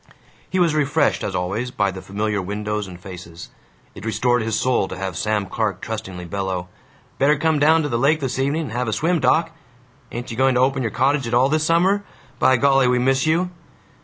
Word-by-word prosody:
He 185 Hz, -, -2 dB
was 170 Hz, -4 st, +3 dB
refreshed, 150 Hz, +1 st, +1 dB
as 95 Hz, -, -3 dB
always, 100 Hz, +8 st, -2 dB
by 100 Hz, -5 st, 0 dB
the 95 Hz, 0 st, -8 dB
familiar 105 Hz, +1 st, -2 dB
windows 105 Hz, +2 st, -3 dB
and 90 Hz, -1 st, -10 dB
faces. 90 Hz, -3 st, -10 dB, 0.4 s
It -, -, -11 dB
restored 115 Hz, +2 st, +1 dB
his 110 Hz, -1 st, -1 dB
soul 125 Hz, -6 st, +1 dB
to 95 Hz, -, -7 dB
have 95 Hz, -2 st, -4 dB
Sam 105 Hz, +3 st, 0 dB
Clark 100 Hz, -1 st, -2 dB
trustingly 95 Hz, -6 st, -6 dB
bellow, 95 Hz, -1 st, -3 dB, 0.5 s
"Better 145 Hz, +2 st, +4 dB
come 160 Hz, 0 st, +1 dB
down 160 Hz, +2 st, +4 dB
to -, -, -1 dB
the 120 Hz, -4 st, -1 dB
lake 150 Hz, +4 st, +3 dB
this 135 Hz, -2 st, -3 dB
evening 140 Hz, +5 st, 0 dB
and 145 Hz, -, -6 dB
have 125 Hz, +1 st, -2 dB
a 110 Hz, -, -1 dB
swim, 170 Hz, +6 st, +1 dB
doc. 165 Hz, +1 st, +2 dB, 0.6 s
Ain't 120 Hz, 0 st, -6 dB
you 115 Hz, -, -6 dB
going 130 Hz, 0 st, +3 dB
to 125 Hz, -, +3 dB
open 135 Hz, +1 st, +2 dB
your 115 Hz, -, -1 dB
cottage 135 Hz, +3 st, +1 dB
at 115 Hz, -, 0 dB
all, 130 Hz, +3 st, +4 dB
this 155 Hz, +1 st, +1 dB
summer? 185 Hz, +5 st, +2 dB, 0.4 s
By 130 Hz, -, +4 dB
golly, 135 Hz, 0 st, +4 dB
we 125 Hz, 0 st, +3 dB
miss 135 Hz, +3 st, +2 dB
you." 175 Hz, +3 st, +1 dB
125 Hz, 215 wpm, -21 LUFS, 100-145 Hz, 0.6 s, Better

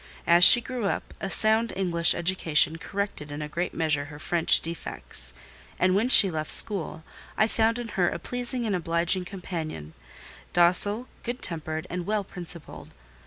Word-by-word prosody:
As 170 Hz, +1 st, +4 dB
she 240 Hz, -, +9 dB
grew 245 Hz, -2 st, -6 dB
up, 195 Hz, -, -4 dB
a 195 Hz, -, -4 dB
sound 220 Hz, +3 st, +2 dB
English 175 Hz, -3 st, +1 dB
education 165 Hz, -3 st, +1 dB
corrected 195 Hz, -8 st, -6 dB
in 145 Hz, +1 st, -6 dB
a -, -, -6 dB
great 175 Hz, +4 st, -4 dB
measure 150 Hz, -3 st, -1 dB
her 145 Hz, 0 st, -12 dB
French 165 Hz, +2 st, +3 dB
defects; 60 Hz, -, -7 dB, 0.5 s
and 185 Hz, 0 st, +1 dB
when 215 Hz, +6 st, 0 dB
she 200 Hz, -7 st, +8 dB
left 155 Hz, -1 st, -5 dB
school, 165 Hz, -6 st, +4 dB, 0.3 s
I 215 Hz, -, +3 dB
found 225 Hz, +1 st, 0 dB
in 240 Hz, -1 st, -7 dB
her 180 Hz, -4 st, 0 dB
a -, -, -5 dB
pleasing 245 Hz, 0 st, -3 dB
and 210 Hz, -3 st, -1 dB
obliging 175 Hz, +1 st, -2 dB
companion: 160 Hz, -, -8 dB, 0.6 s
docile, 205 Hz, +7 st, +2 dB
good 240 Hz, +1 st, -7 dB
tempered, 160 Hz, -1 st, -4 dB
and 180 Hz, -1 st, -5 dB
well 210 Hz, -1 st, -1 dB
principled. 170 Hz, -, -7 dB
175 Hz, 165 wpm, -25 LUFS, 160-205 Hz, 0.6 s, she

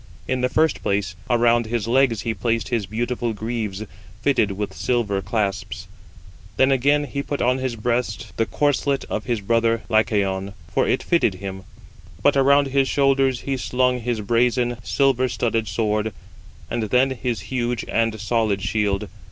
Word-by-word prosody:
In 130 Hz, -1 st, 0 dB
the 125 Hz, -, +1 dB
first 160 Hz, +3 st, +1 dB
place, 100 Hz, -3 st, -1 dB
around 120 Hz, -1 st, +3 dB
his 115 Hz, -1 st, -2 dB
legs 120 Hz, -3 st, +3 dB
he 115 Hz, -, -1 dB
placed 115 Hz, -2 st, -1 dB
his 115 Hz, -6 st, -1 dB
beautiful 120 Hz, +2 st, -2 dB
greaves 110 Hz, -2 st, -3 dB, 0.4 s
fitted 120 Hz, -8 st, +2 dB
with 100 Hz, 0 st, -4 dB
silver 105 Hz, -4 st, 0 dB
clasps; 100 Hz, -1 st, -3 dB, 0.7 s
then 130 Hz, +1 st, +4 dB
again 140 Hz, +3 st, +3 dB
he 140 Hz, -1 st, -3 dB
put 145 Hz, 0 st, -4 dB
on 125 Hz, +2 st, +2 dB
his 130 Hz, -2 st, -2 dB
breast 115 Hz, -2 st, -2 dB
the 115 Hz, -, +1 dB
corslet 145 Hz, -1 st, 0 dB
of 110 Hz, -, -2 dB
his 120 Hz, -4 st, -1 dB
brother 115 Hz, +2 st, +1 dB
Lycaon, 100 Hz, -3 st, +1 dB, 0.2 s
for -, -, +2 dB
it -, -, +1 dB
fitted 165 Hz, -, +2 dB
him; 95 Hz, 0 st, -7 dB, 0.6 s
but 145 Hz, -, +4 dB
around 140 Hz, +1 st, +4 dB
his 135 Hz, 0 st, +2 dB
shoulders 135 Hz, -2 st, +2 dB
he 135 Hz, -1 st, -2 dB
slung 125 Hz, 0 st, +1 dB
his 120 Hz, -2 st, -2 dB
brazen, 120 Hz, +2 st, +1 dB
silver 130 Hz, +1 st, +2 dB
studded 115 Hz, -2 st, -1 dB
sword 110 Hz, -1 st, -1 dB, 0.5 s
and 120 Hz, -, -2 dB
then 130 Hz, +2 st, +3 dB
his 125 Hz, -3 st, -2 dB
huge 120 Hz, +2 st, -2 dB
and 115 Hz, -1 st, 0 dB
solid 105 Hz, -2 st, 0 dB
shield. 100 Hz, -1 st, 0 dB
115 Hz, 160 wpm, -22 LUFS, 105-130 Hz, 0.7 s, then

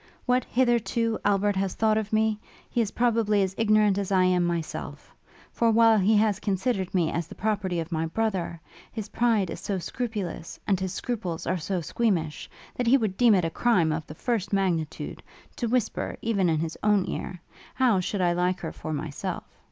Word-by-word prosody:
What, 250 Hz, 0 st, +2 dB
hitherto, 235 Hz, -2 st, +1 dB
Albert 205 Hz, 0 st, +2 dB
has 190 Hz, -1 st, -1 dB
thought 220 Hz, -1 st, +2 dB
of 215 Hz, -1 st, -2 dB
me, 220 Hz, -1 st, +2 dB, 0.3 s
he 240 Hz, -, +1 dB
is 220 Hz, -, 0 dB
probably 225 Hz, -4 st, +2 dB
as 190 Hz, 0 st, -2 dB
ignorant 215 Hz, -2 st, +3 dB
as 200 Hz, -1 st, -3 dB
I 185 Hz, -1 st, +4 dB
am 180 Hz, -1 st, +3 dB
myself; 170 Hz, -2 st, -4 dB, 0.4 s
for 230 Hz, -, +2 dB
while 225 Hz, -1 st, +5 dB
he 210 Hz, +3 st, +4 dB
has 210 Hz, -2 st, +2 dB
considered 195 Hz, -1 st, -1 dB
me 165 Hz, -3 st, +2 dB
as 170 Hz, -1 st, -2 dB
the -, -, -11 dB
property 200 Hz, -4 st, -1 dB
of 165 Hz, +1 st, -5 dB
my 165 Hz, 0 st, -1 dB
brother, 185 Hz, -3 st, -2 dB, 0.3 s
his 215 Hz, -2 st, -6 dB
pride 225 Hz, -6 st, +1 dB
is -, -, -6 dB
so 200 Hz, -, -2 dB
scrupulous, 200 Hz, -3 st, -4 dB
and 195 Hz, -3 st, +1 dB
his 190 Hz, -1 st, -2 dB
scruples 190 Hz, -10 st, -4 dB
are 185 Hz, 0 st, 0 dB
so 180 Hz, +2 st, -2 dB
squeamish, 165 Hz, -4 st, -1 dB, 0.3 s
that 245 Hz, -, -1 dB
he 260 Hz, +4 st, +6 dB
would 215 Hz, -7 st, -1 dB
deem 235 Hz, -1 st, +5 dB
it 180 Hz, -3 st, +2 dB
a 165 Hz, -, -2 dB
crime 180 Hz, -7 st, +2 dB
of 155 Hz, 0 st, -3 dB
the 155 Hz, -, -9 dB
first 225 Hz, 0 st, -2 dB
magnitude, 180 Hz, -6 st, -1 dB, 0.4 s
to 240 Hz, -, -1 dB
whisper, 245 Hz, -1 st, -1 dB
even 200 Hz, -6 st, +1 dB
in 160 Hz, -, +2 dB
his 165 Hz, 0 st, -3 dB
own 210 Hz, -3 st, +3 dB
ear, 180 Hz, -1 st, -5 dB, 0.4 s
How 245 Hz, -7 st, +3 dB
should 185 Hz, +2 st, -2 dB
I 175 Hz, -1 st, +3 dB
like 180 Hz, +1 st, 0 dB
her 160 Hz, -, -4 dB
for 155 Hz, -, -6 dB
myself? 145 Hz, -1 st, -4 dB
200 Hz, 195 wpm, -26 LUFS, 175-225 Hz, 0.4 s, he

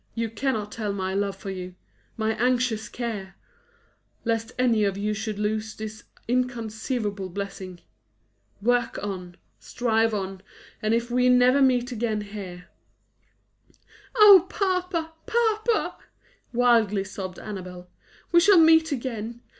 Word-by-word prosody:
you 230 Hz, -1 st, -2 dB
cannot 225 Hz, -4 st, -2 dB
tell 215 Hz, -3 st, -3 dB
my 190 Hz, -1 st, -3 dB
love 200 Hz, 0 st, -1 dB
for 195 Hz, 0 st, -7 dB
you 180 Hz, -1 st, -7 dB, 0.4 s
my 220 Hz, 0 st, 0 dB
anxious 245 Hz, -3 st, +1 dB
care! 210 Hz, -6 st, -5 dB, 0.9 s
lest 225 Hz, 0 st, -1 dB
any 235 Hz, -4 st, +3 dB
of 200 Hz, -1 st, 0 dB
you 210 Hz, +1 st, -1 dB
should 215 Hz, 0 st, -4 dB
lose 215 Hz, +1 st, -2 dB
this 220 Hz, 0 st, -8 dB, 0.2 s
inconceivable 225 Hz, -4 st, -2 dB
blessing. 190 Hz, -1 st, -6 dB, 0.8 s
Work 240 Hz, 0 st, +1 dB
on; 180 Hz, -3 st, -6 dB, 0.2 s
strive 225 Hz, -2 st, +1 dB
on; 190 Hz, -1 st, -4 dB, 0.4 s
and 215 Hz, +1 st, +2 dB
if 235 Hz, +1 st, -2 dB
we 250 Hz, +1 st, +3 dB
never 250 Hz, +2 st, +5 dB
meet 255 Hz, -2 st, +3 dB
again 220 Hz, -2 st, -1 dB
here 195 Hz, -4 st, -8 dB, 0.7 s
" -, -, -29 dB
"Oh, 400 Hz, -5 st, +8 dB
papa, 365 Hz, -4 st, -1 dB, 0.2 s
papa," 450 Hz, -1 st, +1 dB, 0.5 s
wildly 230 Hz, -5 st, +3 dB
sobbed 190 Hz, -1 st, -7 dB
Annabel, 180 Hz, -4 st, -8 dB, 0.4 s
"we 345 Hz, -, +7 dB
shall 390 Hz, +2 st, +6 dB
meet 320 Hz, -1 st, +6 dB
again! 235 Hz, -3 st, -4 dB
225 Hz, 125 wpm, -25 LUFS, 200-250 Hz, 0.9 s, Oh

